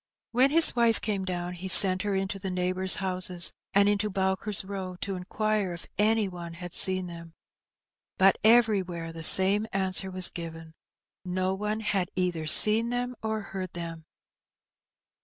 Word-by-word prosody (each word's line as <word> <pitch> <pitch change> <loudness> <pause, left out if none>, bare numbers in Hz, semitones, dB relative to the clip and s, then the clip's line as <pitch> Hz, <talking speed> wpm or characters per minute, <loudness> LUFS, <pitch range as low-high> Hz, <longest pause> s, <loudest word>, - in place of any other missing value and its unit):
When 255 +3 +2
his 325 0 +6
wife 235 -2 +1
came 200 -3 -5
down 180 -1 -6
he 180 +1 -9
sent 185 0 +7
her 205 0 -4
into 195 +1 -5
the 190 - -6
neighbours' 185 +1 +1
houses, 185 -2 +2 0.2
and 200 +1 +2
into 205 +1 -2
Bowker's 190 +1 -1
Eow, 190 -2 -9
to 195 -1 -5
inquire 205 +1 -4
if 170 - -11
any 215 0 0
one 170 -2 -10
had 175 0 -10
seen 185 -1 +2
them. 170 -1 -12 0.8
But 190 0 +2
everywhere 195 -8 0
the 165 - -9
same 195 +6 +3
answer 190 0 -2
was 185 -1 +1
given: 165 -1 -11 0.5
no 185 +1 -3
one 210 +2 -5
had 195 -4 -2
either 175 -4 -4
seen 220 +8 +7
them 245 +1 -5
or 220 0 -5
heard 190 -2 -9
them. 165 -2 -9
190 Hz, 160 wpm, -25 LUFS, 180-210 Hz, 0.8 s, sent